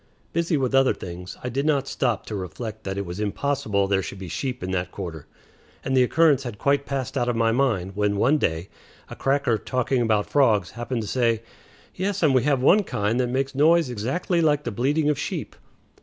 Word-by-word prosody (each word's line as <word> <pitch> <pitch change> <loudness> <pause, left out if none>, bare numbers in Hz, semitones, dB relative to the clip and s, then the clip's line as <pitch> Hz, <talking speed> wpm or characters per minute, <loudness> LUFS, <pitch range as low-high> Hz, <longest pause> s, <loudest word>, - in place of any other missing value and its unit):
Busy 170 -1 +1
with 130 -1 -1
other 135 0 +4
things, 90 0 -8
I 125 - -2
did 135 +3 -1
not 145 -3 +1
stop 120 -6 -1
to 110 - -5
reflect 105 +4 -6
that 95 0 -3
it 100 - -2
was 90 +2 -6
impossible 105 -2 0
there 95 -1 +2
should 95 - -7
be 95 -2 -7
sheep 125 - -4
in 95 - -3
that 90 -1 -2
quarter, 80 -4 -7 0.6
and 135 - 0
the 130 - +5
occurrence 145 +2 +4
had 120 -6 -6
quite 140 +3 +1
passed 135 -1 -3
out 120 - 0
of 120 - 0
my 115 0 +2
mind 110 -7 0
when, 105 0 +1
one 140 +9 +3
day, 80 - -1 0.4
a - - -6
cracker, 135 -5 +1
talking 130 0 0
about 110 -3 +1
frogs, 110 - +2
happened 120 0 -3
to - - -6
say, 115 0 +1 0.5
"Yes, 195 0 -2
and 150 -4 +4
we 130 - +4
have 140 -2 +1
one 200 +9 +6
kind 105 - -1
that 125 - +1
makes 135 +2 -1
a 135 - -5
noise 160 -2 +4
exactly 140 - -1
like 150 -2 +2
the - - -3
bleating 145 +8 +1
of 150 -2 +1
sheep." - - -4
125 Hz, 215 wpm, -24 LUFS, 105-140 Hz, 0.6 s, one